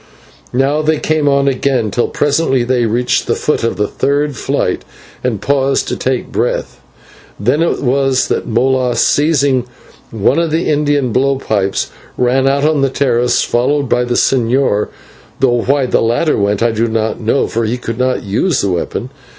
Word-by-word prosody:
Now 140 +4 +2
they 155 0 +1
came 155 -2 0
on 140 0 +2
again, 130 -5 0
till 120 - 0
presently 145 -3 +1
they 120 -1 +1
reached 120 +2 0
the - - +1
foot 150 - -1
of 115 - 0
the 105 - +1
third 145 +3 -1
flight, - - -1 0.4
and 120 -5 -1
paused 135 +1 0
to - - -2
take 130 -1 -2
breath. 120 +2 -2 0.6
Then 125 +10 +1
it 170 - 0
was 135 0 +1
that - - -2
Molas, 125 +1 +1
seizing 140 -4 +2 0.4
one 115 +7 +1
of 170 -1 0
the 160 +2 -1
Indian 145 -4 +1
blow 135 +3 +1
pipes, 100 -6 -1 0.3
ran 130 +2 +2
out 140 +1 +1
on 155 0 +2
to - - 0
the - - -3
terrace, 125 -3 +1
followed 135 +3 0
by 125 0 +2
the 120 0 -2
señor, 125 -4 +1 0.5
though 120 -2 +2
why 135 +2 +1
the - - +1
latter 120 +7 +1
went 100 +1 0
I 120 - +2
do 110 +1 0
not 110 -1 -1
know, 115 +5 +1
for 115 - -2
he 115 +3 -1
could 115 -1 -5
not 130 0 0
use 120 - 0
this 100 - 0
weapon. 100 +8 -3
130 Hz, 180 wpm, -15 LUFS, 120-140 Hz, 0.6 s, Now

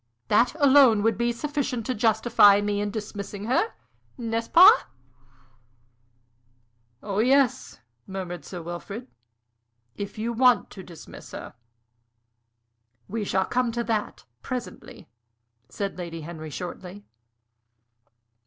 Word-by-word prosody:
That 235 +7 +3
alone 265 -7 +6
would 225 -1 +2
be 235 +3 0
sufficient 255 -2 -3
to 255 - -1
justify 220 -2 +4
me 205 0 -1
in 205 - -2
dismissing 205 -1 -6
her. 265 - 0 0.4
N'est 230 -1 -2
ce - - -18
pas?" 350 +2 +7 2.2
"Oh 200 -1 -3
yes," 265 +2 +2 0.3
murmured 180 -4 -6
Sir 175 +3 -8
Wilfrid, 195 +8 -7 0.9
"if 200 +1 -7
you 230 +2 -2
want 250 +1 +3
to 190 - -9
dismiss 175 -3 -13
her." - - -8 1.5
"We 220 +1 -3
shall 190 -1 0
come 250 -1 0
to 235 0 -2
that 220 -3 -3 0.2
presently," 240 - -7 0.6
said 200 -2 -5
Lady 165 -2 -6
Henry, 155 0 -8
shortly. 180 +4 -8
215 Hz, 115 wpm, -25 LUFS, 195-240 Hz, 2.2 s, pas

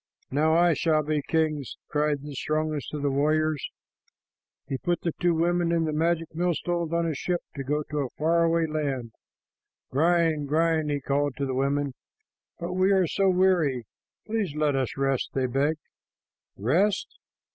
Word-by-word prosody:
"Now 155 +3 +3
I 170 0 +5
shall 155 0 +2
be 150 0 0
king," 155 -2 0 0.2
cried 150 -1 0
the 145 -1 -7
strongest 155 +1 -2
of 150 -1 -4
the 140 - +1
warriors. 155 +1 +1 1.0
He 135 -2 -3
put 175 -1 -1
the 170 - -1
two 175 -1 +3
women 170 +1 +1
and 165 -1 +2
the 155 - -2
magic 165 +1 0
millstones 170 0 -1
on 170 0 +1
a 165 - 0
ship 175 +5 -2
to 140 - -4
go 150 +3 -1
to 150 - -1
a 135 -3 -1
far 165 +2 +3
away 165 0 +2
land. 140 -6 -2 0.8
"Grind, 160 0 +2
grind," 160 0 +2
he 145 -1 -1
called 140 0 0
to 140 - -1
the 130 - -2
women. 140 +1 0 0.7
"But 170 +1 -4
we 185 +2 +3
are 190 -2 +4
so 195 +4 +1
weary. 180 -10 +2 0.4
Please 215 -8 -2
let 150 -2 +1
us 135 -1 -1
rest," 135 -1 0
they 135 -1 +1
begged. 140 +5 +1 0.8
"Rest? 170 - +1
155 Hz, 170 wpm, -26 LUFS, 140-170 Hz, 1.0 s, I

